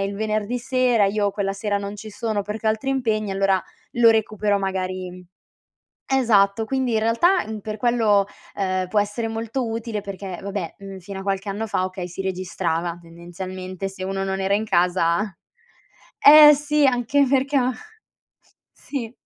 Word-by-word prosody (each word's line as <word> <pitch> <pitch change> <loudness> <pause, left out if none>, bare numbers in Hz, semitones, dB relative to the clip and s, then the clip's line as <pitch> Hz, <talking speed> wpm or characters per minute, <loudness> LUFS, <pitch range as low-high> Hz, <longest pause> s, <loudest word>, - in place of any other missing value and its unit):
il 200 0 -2
venerdì 215 +2 -1
sera, 250 -3 +2
io 205 0 0
quella 195 -1 -2
sera 205 0 -2
non 200 +1 -5
ci 215 +1 -9
sono 210 -1 -2
perché 210 +2 -5
ho - - +5
altri 220 +5 -3
impegni 220 -6 0
e - - -1
allora 195 -1 +2 0.3
lo 235 -1 +6
recupero 210 -2 +1
magari 190 -1 -2 1.3
esatto. 225 -5 +3
Quindi 260 -1 -1
in 220 - +2
realtà, 290 - +3
mhmm, 220 -1 -5
per 215 +1 -5
quello, 220 -4 +3 0.3
ehm, 185 -2 -1
può 210 +3 +1
essere 210 +3 -2
molto 230 +2 -3
utile. 225 -2 -4
Perché 195 -2 -7
vabbè, 200 -4 -4
uhm, 195 -1 -9
fino 195 +1 -8
a - - -7
qualche 195 0 -2
anno 210 +3 -3
fa, 185 - 0
okay, 185 -1 -5
si 180 +2 -6
registrava 175 -2 -2
tendenzialmente 185 +3 -7
se 190 -1 -8
uno 195 0 -2
non 190 0 -2
era 190 +1 0
in 215 +2 +1
casa 175 +1 +1 0.9
eh 300 0 +10
sì, 295 0 +1
anche 260 +2 +2
perché 275 +1 +1
a 255 0 +2 1.0
sì. 250 -4 -6
205 Hz, 170 wpm, -22 LUFS, 195-230 Hz, 1.3 s, eh